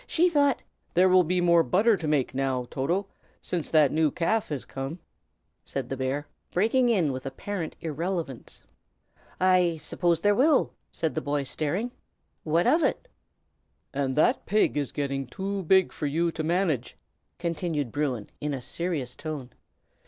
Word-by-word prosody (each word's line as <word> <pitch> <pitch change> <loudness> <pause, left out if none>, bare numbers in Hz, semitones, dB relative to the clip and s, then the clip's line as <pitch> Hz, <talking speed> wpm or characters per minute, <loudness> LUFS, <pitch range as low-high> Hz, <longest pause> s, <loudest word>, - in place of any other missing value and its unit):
She 350 +2 +3
thought 285 -4 +2
" - - -43
"There 180 +2 +6
will 185 0 +6
be 180 +2 0
more 170 -1 +5
butter 210 +7 +3
to 170 -5 -4
make, 145 -5 +1
now, 130 -2 -1
Toto, 170 +9 0 0.3
since 170 -4 -3
that 155 -4 +5
new 155 0 +3
calf 205 +8 0
has 145 -4 -4
come," 135 +5 -5 0.7
said 135 -3 -4
the 135 - -2
bear, 135 +3 -2 0.3
breaking 235 +7 +3
in 180 -11 +2
with 130 0 -5
apparent 165 +5 -5
irrelevance. 165 -3 -4 0.8
"I 180 -2 +3
suppose 170 +1 0
there 205 +2 +4
will!" 275 +6 +3 0.2
said 160 -2 -1
the 155 - -2
boy, 145 -1 -1
staring. 160 - -2 0.5
"What 165 +2 +2
of 330 - +4
it?" - - 0 0.9
"And 135 -2 -1
that 155 - +2
pig 210 -4 +2
is 145 -3 -1
getting 140 -2 -2
too 195 +8 -3
big 190 +2 +4
for 150 - -3
you 165 +4 +1
to 160 - -4
manage," 165 -6 0 0.4
continued 165 -6 -2
Bruin, 135 -8 -2
in 150 -1 -2
a - - -4
serious 150 -4 -3
tone. 145 -6 -6
160 Hz, 160 wpm, -27 LUFS, 140-185 Hz, 0.9 s, There